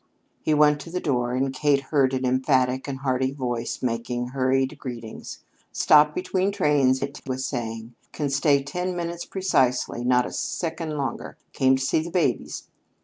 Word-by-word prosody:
He 155 - +1
went 150 0 +4
to 170 - -9
the 180 +2 -2
door, 125 -6 0
and 135 +1 0
Kate 140 0 +2
heard 135 -3 +3
an 130 0 -1
emphatic 130 0 +1
and 135 -1 -5
hearty 130 -1 0
voice 120 -4 -3
making 120 +1 -2
hurried 135 +2 0
greetings. 120 -5 -8 0.3
"Stopped 150 0 +5
between 185 +1 0
trains," 145 -8 +2
it 140 0 -6
was 130 0 -2
saying. 115 -2 -4 0.2
"Can 145 -3 -2
stay 140 0 +3
ten 180 +6 -3
minutes 170 0 -4
precisely 130 -10 0
not 125 0 +3
a - - -6
second 160 -2 -3
longer. 135 -4 -4 0.2
Came 130 0 +3
to 130 - -2
see - - +2
the 160 +2 -4
babies." 175 -1 -1
135 Hz, 165 wpm, -24 LUFS, 125-150 Hz, 0.3 s, Stopped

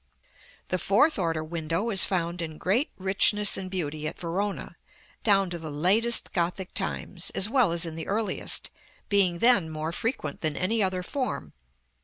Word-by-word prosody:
The 185 - -1
fourth 210 - +3
order 165 -3 -1
window 165 +6 -2
is 195 - +7
found 175 -2 -2
in 160 -2 -5
great 220 - 0
richness 200 +2 +3
and 190 -1 -4
beauty 155 -5 -3
at - - -6
Verona, 190 +4 -3 0.5
down 195 -4 +3
to 175 - -4
the 160 -1 -7
latest 195 +11 +1
Gothic 180 +1 -2
times, 180 -3 -3
as 195 - +4
well 250 -9 +3
as 170 0 +2
in 165 - -4
the 160 0 -6
earliest, 205 -1 0 0.4
being 195 -4 +2
then 205 -5 +4
more 155 +1 -4
frequent 230 +9 -3
than 155 -2 0
any 220 +5 +1
other 185 -2 -1
form. 215 - -4
185 Hz, 165 wpm, -26 LUFS, 165-205 Hz, 0.5 s, is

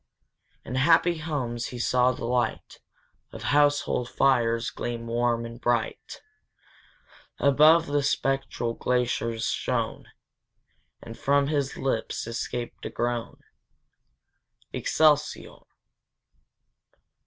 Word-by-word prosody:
In 125 - -6
happy 165 +5 +3
homes 130 -7 -3
he 125 - -7
saw 125 +1 +2
the 115 - -6
light 120 +1 -2 0.5
Of - - -9
household 145 -4 +2
fires 115 -4 +2
gleam 120 -1 -5
warm 120 0 0
and 115 +1 -9
bright; 120 -2 -2 1.1
Above, 155 +4 +5
the 145 -1 0
spectral 135 -4 -1
glaciers 115 -2 -1
shone, - - -2 1.0
And 115 0 -9
from 140 +2 +1
his 140 -3 -1
lips 130 -4 -2
escaped 120 +1 -5
a - - -4
groan, 120 -1 -3 1.3
Excelsior! 150 -1 +1
125 Hz, 95 wpm, -26 LUFS, 115-145 Hz, 1.3 s, Above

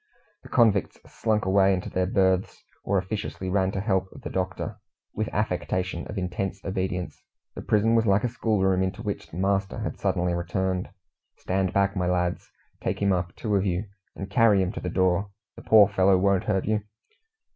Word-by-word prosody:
The - - -14
convicts 110 -6 +3
slunk 110 -3 -1
away 95 0 +4
into 90 - -5
their 90 0 0
berths, 95 -1 +1 0.2
or 100 - +1
officiously 95 -1 -3
ran 95 -1 +2
to - - -2
help 95 -3 0 0.2
"the - - -5
doctor," 95 0 -3 0.4
with 110 0 -2
affectation 90 -4 -2
of 105 - -7
intense 95 +1 -3
obedience. 95 -2 -3 0.3
The - - -7
prison 110 +2 +2
was 115 -1 +3
like 100 +1 +3
a - - +2
schoolroom, 100 -6 +1
into 95 +4 -2
which 105 -2 -4
the 80 - -9
master 95 0 0
had - - -4
suddenly 90 0 0
returned. 90 +2 -2 0.5
"Stand 95 0 -1
back, 100 0 +1
my 90 -2 0
lads! 90 -1 -1 0.3
Take - - -2
him 100 -1 +2
up, 85 -1 -2
two 105 - -3
of 95 - +2
you, 95 +1 -1 0.3
and 95 - -6
carry 105 -1 +4
him 90 - -2
to - - -6
the 90 - -3
door. 95 +3 +1 0.3
The - - -11
poor 105 -3 +6
fellow 95 -1 +3
won't 100 +1 +2
hurt 95 -3 0
you." 105 0 +1
95 Hz, 185 wpm, -26 LUFS, 90-100 Hz, 0.5 s, poor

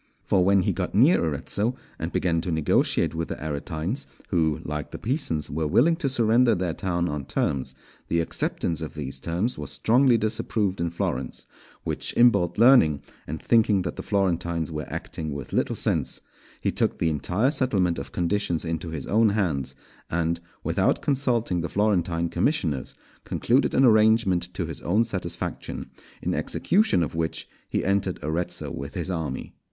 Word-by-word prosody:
For 95 -2 +2
when 95 0 +4
he - - +1
got 90 0 -3
near 130 - +5
Arezzo, 85 - -1 0.2
and - - -3
began 85 -2 +1
to 90 - -3
negotiate 80 0 +2
with 80 0 -2
the - - -4
Aretines, 80 - -3 0.2
who, 80 -4 +1
like 75 -1 -4
the - - -7
Pisans, 115 - -1
were 80 +1 -1
willing 145 - +4
to 145 -5 -1
surrender 120 -1 +3
their 90 -2 -1
town 85 -1 -1
on 75 -2 -3
terms, 65 -2 -1 0.3
the 85 - +1
acceptance 85 0 -1
of 80 - -6
these 70 -3 -5
terms 85 - -1
was 75 -3 -5
strongly 115 - +3
disapproved 105 -3 -1
in 85 - 0
Florence; 65 -6 -3 0.4
which - - -1
Imbalt 120 -8 +4
learning, 115 - +5 0.2
and 80 +2 -4
thinking 110 -5 +3
that 85 - -4
the - - -5
Florentines 85 -4 0
were 75 -1 -5
acting 80 -2 -5
with 70 -1 -7
little - - +1
sense, - - 0 0.4
he - - +1
took - - 0
the 80 - +1
entire 90 - +1
settlement 95 - +1
of 70 - -7
conditions 85 -2 -1
into 80 +1 -3
his 80 -4 -5
own 110 +1 +3
hands, 90 -11 -1 0.3
and, 85 0 0 0.2
without - - +1
consulting 120 -10 +1
the 85 - -3
Florentine 90 -5 +1
commissioners, 85 - -1 0.3
concluded 130 +4 +1
an 135 - +5
arrangement 110 -6 +4
to 90 - -2
his 80 - -5
own 105 +7 +2
satisfaction, 100 -5 -4 0.3
in - - 0
execution 180 - +2
of 75 - -4
which 80 0 -2 0.2
he - - -1
entered 95 -1 +1
Arezzo 80 +4 -2
with 70 +1 -6
his 90 +1 -2
army. 80 -4 -4
90 Hz, 165 wpm, -25 LUFS, 80-110 Hz, 0.4 s, near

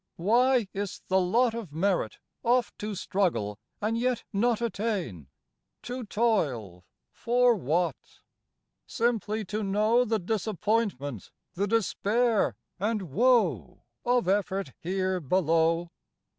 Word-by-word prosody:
Why 240 +5 +3
is 200 -1 -3
't - - -26
the 190 0 +4
lot 230 +6 +2
Of 225 -9 -6
merit 170 - 0 0.2
oft 245 +1 +1
to 210 0 -4
struggle 165 - -1 0.2
and 215 +2 -1
yet 245 0 0
not 225 +3 +2
Attain? 195 - -3 0.6
to 250 +1 -5
toil 135 - -1 0.3
for 245 0 +3
what? 170 - 0 0.9
Simply 220 -2 -1
to 210 +3 -3
know 215 +4 +3
The 225 -2 0
disappointment, 205 - -1 0.2
the 200 +3 -1
despair 225 +1 +1 0.2
and 205 -5 -2
woe 190 - +2 0.2
Of 245 -4 +2
effort 195 - 0
here 185 +1 -1
below? 165 +1 +1
205 Hz, 115 wpm, -28 LUFS, 175-230 Hz, 0.9 s, the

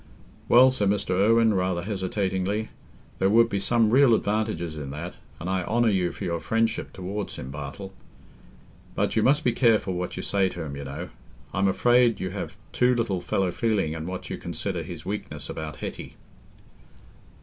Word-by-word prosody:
"Well," 130 +2 +7
said 105 -6 0
Mr. 100 -2 0
Irwine, 110 +4 +4
rather 90 -2 0
hesitatingly, 100 +1 -1 0.5
"there 95 - +3
would 115 +2 +5
be 100 - -1
some 115 +1 +3
real 130 -2 +6
advantages 105 -7 -1
in 75 -3 -6
that... 85 +5 -6 0.3
and 85 - -6
I 95 -1 0
honour 115 +3 +2
you 90 -3 +1
for - - -8
your 85 -1 -1
friendship 115 +6 0
towards 100 +3 -5
him, 65 - -7
Bartle. 75 +7 -7 1.0
But... - - 0
you - - +3
must 140 +3 +3
be 120 - +3
careful 115 -6 +2
what 90 0 -4
you 95 - -4
say 95 -2 +1
to 90 -2 -6
him, 70 -3 -6
you 70 0 -6
know. 70 +1 -6 0.4
I'm 100 0 +2
afraid 120 +4 +3
you 95 -1 -3
have 100 - -5 0.2
too 125 0 +3
little 105 -6 -1
fellow 90 +1 0
feeling 105 -7 0
in 80 0 -5
what 95 0 -5
you - - -5
consider - - -3
his - - -8
weakness - - -5
about 80 -1 -5
Hetty." - - -7
95 Hz, 180 wpm, -26 LUFS, 90-115 Hz, 1.0 s, Well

